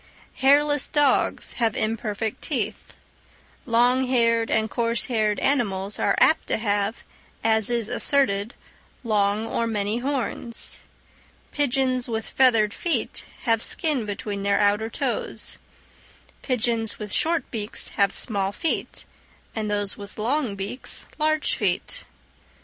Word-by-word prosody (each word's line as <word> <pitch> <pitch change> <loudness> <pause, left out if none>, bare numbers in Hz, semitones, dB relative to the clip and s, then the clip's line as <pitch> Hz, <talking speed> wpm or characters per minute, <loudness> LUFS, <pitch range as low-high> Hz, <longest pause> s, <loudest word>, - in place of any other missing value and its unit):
Hairless 290 +1 +4
dogs 290 -3 +2
have 225 -2 +2
imperfect 220 -1 -2
teeth; 250 -9 -3 0.7
long 245 +2 +3
haired 230 -2 +3
and 220 0 +2
coarse 230 +1 0
haired 215 -4 +1
animals 205 -7 0
are - - +2
apt 320 - +4
to - - +1
have, 205 0 -1 0.4
as 220 -1 +2
is 235 -3 0
asserted, 240 -4 +1 0.5
long 210 -1 +1
or 230 0 -1
many 210 0 -1
horns; 250 -3 -3 0.7
pigeons 260 -3 +1
with 225 -1 -2
feathered 225 -6 +4
feet 345 - -2 0.2
have 230 -3 +2
skin 280 -7 -1
between 205 0 -4
their 200 0 +2
outer 210 +2 +2
toes; - - -2 0.8
pigeons 230 -3 0
with 210 -1 -6
short 325 -3 0
beaks 215 -2 -3
have 200 -2 +2
small 200 -4 0
feet, 325 +9 -2 0.5
and 215 -2 -2
those 205 -1 -1
with 200 0 -10
long 240 0 0
beaks 200 +6 -5
large 310 0 +2
feet. 205 - -1
225 Hz, 120 wpm, -24 LUFS, 210-255 Hz, 0.8 s, Hairless